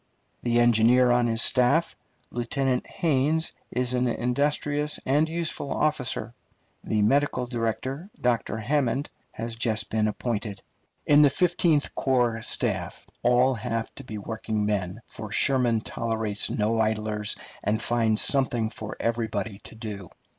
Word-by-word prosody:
The 120 0 +1
engineer 120 +2 +5
on 120 0 +3
his 115 0 +1
staff, 135 +7 +3 0.4
Lieutenant 125 +1 -1
Hains, 155 +1 0 0.2
is 125 0 -1
an 125 0 +1
industrious 145 +4 0
and 150 +4 +2
useful 165 -4 -3
officer. 130 -5 -1 0.5
The 105 -1 0
medical 135 +2 +2
director, 125 - -3
Dr. 115 -3 0
Hammond, 140 +4 0 0.2
had 115 0 -6
just 110 -2 0
been 110 -1 +1
appointed. 105 -3 -3 0.4
In 145 0 +6
the 145 - +7
Fifteenth 170 -1 +1
Corps 120 -4 +1
staff - - -1 0.2
all 125 +2 +4
have 115 0 -3
to - - -9
be 110 - -7
working 110 0 -3
men, 100 0 -2
for 110 -1 -9
Sherman 120 -1 +3
tolerates 110 -2 -1
no 110 +1 0
idlers 110 -1 0 0.3
and 110 +1 +1
finds 115 -2 +2
something 120 -5 +2
for 110 -1 -7
everybody 110 -3 -2
to - - -11
do. 105 -5 -7
120 Hz, 130 wpm, -26 LUFS, 110-135 Hz, 0.5 s, the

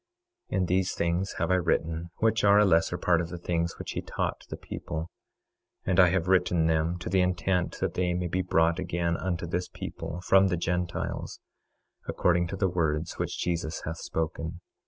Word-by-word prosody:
26:8 - - 0
And 90 -1 +1
these 95 +1 +1
things 85 +3 0
have - - 0
I 95 - +5
written, 85 -1 0
which 110 0 +1
are 100 0 +6
a 105 - +6
lesser 85 -1 +3
part 85 -1 +2
of 85 - -4
the 90 - -6
things 85 -1 -2
which - - -6
he - - -3
taught - - -3
the - - -5
people; 80 +2 -6 0.7
and 95 0 +2
I 90 - +8
have 90 -1 0
written 90 -3 +3
them 80 +2 +1
to 85 - -7
the 95 +1 +3
intent 90 0 0
that - - 0
they 90 -1 0
may 90 0 -1
be 90 +2 0
brought 85 -1 +2
again 85 -2 -1
unto 85 -1 -2
this 90 +2 -2
people, 85 - -6
from 95 +1 +5
the 90 -2 0
Gentiles, 90 +1 -2 0.7
according 85 -1 +2
to 95 - -4
the 95 0 +1
words 80 -2 -1
which - - -2
Jesus 85 -2 -2
hath 80 +1 -4
spoken. 80 +1 -3
85 Hz, 195 wpm, -28 LUFS, 85-90 Hz, 0.7 s, I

